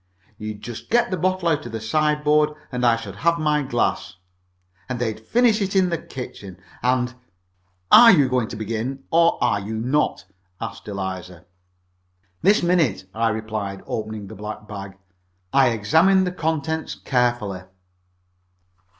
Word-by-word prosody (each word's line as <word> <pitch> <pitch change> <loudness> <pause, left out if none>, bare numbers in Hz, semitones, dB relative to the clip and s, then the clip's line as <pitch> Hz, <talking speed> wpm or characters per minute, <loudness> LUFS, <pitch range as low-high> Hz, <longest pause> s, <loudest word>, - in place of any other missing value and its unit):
You'd 105 -1 -6
just 120 -1 -8
get 240 0 +2
the - - +1
bottle 185 0 0
out 155 -2 0
of - - -9
the 115 - -3
sideboard, 150 +4 +2 0.2
and 125 -1 -3
I 120 -2 +5
should 105 -4 -8
have 170 +1 +2
my 150 -2 +1
glass, 120 -7 -1 0.7
and 130 - -2
they'd 110 -3 -2
finish 225 - +2
it 195 0 -2
in 185 -2 +4
the 170 -2 -1
kitchen, 100 -7 -9 0.2
and 125 0 +1 0.4
" 90 0 -44
"Are 240 - +9
you 150 -10 +6
going 125 -3 0
to - - -7
begin, 115 +5 -4
or 170 +1 +4
are 120 -4 +2
you 105 +3 -5
not?" 125 +1 0 0.3
asked - - -7
Eliza. 95 -3 -6 1.0
"This 200 +2 +4
minute," 150 - +1
I 115 +1 +1
replied, 110 -3 -4
opening 110 -1 -4
the 105 - -10
black 105 +1 -7
bag. 100 -2 -8 0.6
I 135 -1 +5
examined 160 - +3
the 180 - -1
contents 160 -2 -2
carefully. 120 -7 -1
125 Hz, 150 wpm, -22 LUFS, 105-160 Hz, 1.0 s, Are